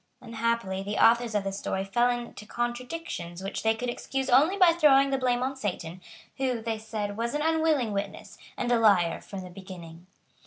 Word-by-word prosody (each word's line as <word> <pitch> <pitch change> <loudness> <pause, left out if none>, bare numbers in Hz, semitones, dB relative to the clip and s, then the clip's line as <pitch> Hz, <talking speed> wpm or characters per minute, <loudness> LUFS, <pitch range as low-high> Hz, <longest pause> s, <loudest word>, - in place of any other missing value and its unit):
Unhappily, 230 -5 -2
the 205 +2 -4
authors 235 0 +4
of 205 - +1
this 195 0 -4
story 190 -1 -2
fell 240 +5 +2
into 240 -3 -5
contradictions 240 - -4
which 195 - -4
they 220 0 +2
could 245 +2 -4
excuse 265 +2 -3
only 305 +10 +5
by 365 -3 +7
throwing 275 -5 +5
the 270 - +2
blame 250 -1 +1
on 265 +1 -2
Satan, 185 -7 -4 0.4
who, 260 -3 0
they 225 -1 -3
said, 215 -2 -4
was 235 +4 -2
an 295 - 0
unwilling 315 -7 +2
witness, 200 0 -5 0.2
and 245 - -1
a 240 - +4
liar 185 -7 +3
from 195 -2 -8
the 180 -1 -10
beginning. 175 -2 -11
230 Hz, 190 wpm, -27 LUFS, 195-255 Hz, 0.4 s, by